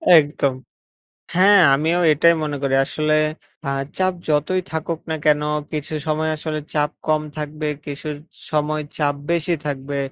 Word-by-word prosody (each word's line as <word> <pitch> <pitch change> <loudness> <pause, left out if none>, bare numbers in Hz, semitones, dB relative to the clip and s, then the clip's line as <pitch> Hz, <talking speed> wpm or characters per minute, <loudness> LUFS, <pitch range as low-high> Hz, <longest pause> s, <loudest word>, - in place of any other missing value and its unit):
একদম। 145 -3 +3 0.8
হ্যাঁ, 195 +2 +6
আমিও 160 +5 +1
এটাই 170 +3 +5
মনে 150 -1 -2
করি। 135 -1 +1
আসলে 155 +2 0 0.5
আ - - -2 0.3
চাপ 185 0 +2 0.2
যতই 155 +5 +2
থাকুক 160 +1 -3
না 160 - 0
কেন? 150 -1 +4 0.3
কিছু 155 0 -4
সময় 155 +1 0
আসলে 155 0 -3 0.2
চাপ 150 0 +2 0.2
কম 155 -1 +2 0.2
থাকবে, 150 0 -3 0.2
কিছু 145 +2 -6 0.4
সময় 155 0 0 0.2
চাপ 145 -1 +2 0.2
বেশি 170 0 +1
থাকবে। 140 0 -3
155 Hz, 140 wpm, -21 LUFS, 150-160 Hz, 0.8 s, হ্যাঁ